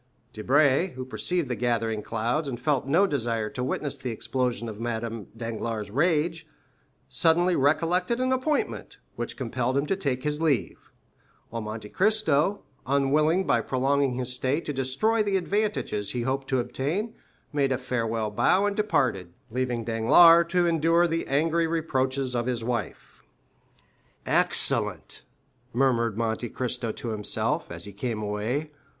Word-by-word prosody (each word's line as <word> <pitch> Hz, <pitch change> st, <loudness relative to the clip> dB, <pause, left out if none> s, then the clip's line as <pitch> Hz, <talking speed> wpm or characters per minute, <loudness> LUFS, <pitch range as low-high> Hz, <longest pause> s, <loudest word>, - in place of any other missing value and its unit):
Debray, 140 Hz, -, +2 dB
who 130 Hz, 0 st, -5 dB
perceived 170 Hz, +4 st, -1 dB
the 125 Hz, -, -2 dB
gathering 115 Hz, -2 st, -1 dB
clouds, 120 Hz, +8 st, -1 dB
and 120 Hz, -4 st, -4 dB
felt 135 Hz, 0 st, 0 dB
no 170 Hz, +8 st, +4 dB
desire 115 Hz, -, -1 dB
to 125 Hz, -, -4 dB
witness 140 Hz, +2 st, -2 dB
the 125 Hz, -, -4 dB
explosion 120 Hz, +1 st, -2 dB
of 110 Hz, -2 st, -7 dB
Madame 115 Hz, -2 st, -4 dB
Danglars' 115 Hz, -2 st, -4 dB
rage, 160 Hz, -, +1 dB, 0.6 s
suddenly 175 Hz, +2 st, +3 dB
recollected 175 Hz, -, +1 dB
an 255 Hz, 0 st, +1 dB
appointment, 260 Hz, +4 st, -1 dB, 0.2 s
which -, -, -5 dB
compelled 130 Hz, 0 st, -1 dB
him 140 Hz, -, +1 dB
to 195 Hz, -, 0 dB
take 135 Hz, -9 st, -2 dB
his 150 Hz, +1 st, -2 dB
leave; 145 Hz, -9 st, -1 dB, 0.6 s
while 115 Hz, 0 st, -3 dB
Monte 110 Hz, 0 st, -6 dB
Cristo, 200 Hz, -, +1 dB, 0.2 s
unwilling 150 Hz, +6 st, +2 dB
by -, -, +2 dB
prolonging 135 Hz, 0 st, +1 dB
his 125 Hz, 0 st, -3 dB
stay 130 Hz, +4 st, 0 dB
to 150 Hz, -, -4 dB
destroy 135 Hz, -, +1 dB
the 200 Hz, -2 st, +1 dB
advantages 190 Hz, -, -1 dB
he 120 Hz, -1 st, -2 dB
hoped 135 Hz, +2 st, -2 dB
to 130 Hz, -, +1 dB
obtain, 160 Hz, -, -2 dB, 0.4 s
made 140 Hz, -2 st, +1 dB
a 130 Hz, -, +1 dB
farewell 115 Hz, -4 st, -2 dB
bow 185 Hz, -, +3 dB
and 205 Hz, -1 st, 0 dB
departed, 130 Hz, -, 0 dB, 0.2 s
leaving 125 Hz, -1 st, -1 dB
Danglars 165 Hz, +10 st, +6 dB
to 180 Hz, 0 st, +2 dB
endure 165 Hz, +1 st, +3 dB
the 165 Hz, -1 st, -1 dB
angry 165 Hz, +4 st, +1 dB
reproaches 135 Hz, -5 st, -1 dB
of 120 Hz, 0 st, -1 dB
his 120 Hz, -3 st, -2 dB
wife. 115 Hz, -6 st, -4 dB, 1.0 s
20347m -, -, -2 dB
"Excellent," -, -, +1 dB, 0.5 s
murmured 115 Hz, -4 st, +1 dB
Monte 115 Hz, +1 st, -1 dB
Cristo 125 Hz, -2 st, -2 dB
to 115 Hz, -, -6 dB
himself, 105 Hz, -2 st, -1 dB
as -, -, -5 dB
he 100 Hz, -, -9 dB
came 110 Hz, +1 st, -3 dB
away. 110 Hz, +9 st, -2 dB
130 Hz, 150 wpm, -26 LUFS, 115-165 Hz, 1.0 s, Danglars